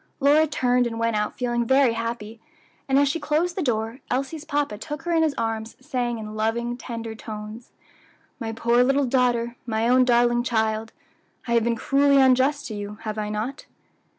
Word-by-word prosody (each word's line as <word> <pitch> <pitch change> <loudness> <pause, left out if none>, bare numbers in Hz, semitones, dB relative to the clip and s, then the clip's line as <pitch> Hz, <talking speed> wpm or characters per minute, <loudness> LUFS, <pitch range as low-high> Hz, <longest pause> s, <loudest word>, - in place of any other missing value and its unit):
Lora 295 +3 +4
turned 250 -4 +1
and 230 -1 -5
went 230 -1 0
out 210 0 -2
feeling 240 -1 0
very 265 0 +4
happy, 230 -1 -5 0.5
and 270 - +4
as 285 0 +4
she 290 +5 -1
closed 315 +4 0
the 380 - -2
door, 230 -3 -1
Elsie's 275 +4 -2
papa 290 -7 -1
took 295 +5 -6
her 345 - -2
in 330 -1 +3
his 310 -3 +1
arms, 225 -1 -3
saying 250 -4 -2
in 215 -1 -7
loving, 235 +2 -1
tender 230 -2 -6
tones, 220 +1 -8 0.7
"My 225 -3 -3
poor 235 +2 +2
little 275 +2 +2
daughter! 240 -2 +1
my 225 0 0
own 255 +1 +5
darling 240 -1 +3
child! 220 -2 -1 0.6
I - - -3
have 235 -1 +3
been 235 0 +1
cruelly 280 +3 +3
unjust 265 +2 +3
to - - -5
you, 205 0 -6
have 215 -1 -4
I 210 0 -3
not?" 220 +7 -4
240 Hz, 185 wpm, -24 LUFS, 225-275 Hz, 0.7 s, own